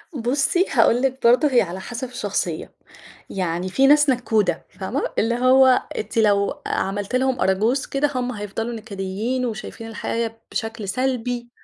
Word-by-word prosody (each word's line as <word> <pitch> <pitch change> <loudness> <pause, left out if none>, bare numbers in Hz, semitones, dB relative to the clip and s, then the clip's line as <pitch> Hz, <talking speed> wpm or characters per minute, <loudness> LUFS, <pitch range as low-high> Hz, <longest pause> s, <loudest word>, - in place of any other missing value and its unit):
بُصّي، 275 +9 +1
هاقول 235 -1 +4
لِك 265 0 0
برضه 245 +6 +5
هي 245 - +5
على 180 +2 -4
حسب 240 +6 -5
الشخصية 250 - -3 0.6
يعني 180 -1 -2
في 270 +8 +3
ناس 295 0 +5
نكُّودة 220 -8 +1
فاهمة؟ 190 - -4 0.2
اللي 235 +2 +1
هو 255 +1 +5
أنتِ 215 +2 -5
لو 200 -2 +2
عملتِ 200 +4 -2
لهم 260 0 +1
أراجوز 220 +8 +1
كده، 285 +1 0
هم 250 0 -1
هيفضلوا 220 +2 -4
نكديين 220 +3 -3
وشايفين 225 0 -6
الحياة 225 0 -3
بشكل 225 -2 -4
سلبي 245 +1 -2
235 Hz, 145 wpm, -22 LUFS, 205-255 Hz, 0.6 s, برضه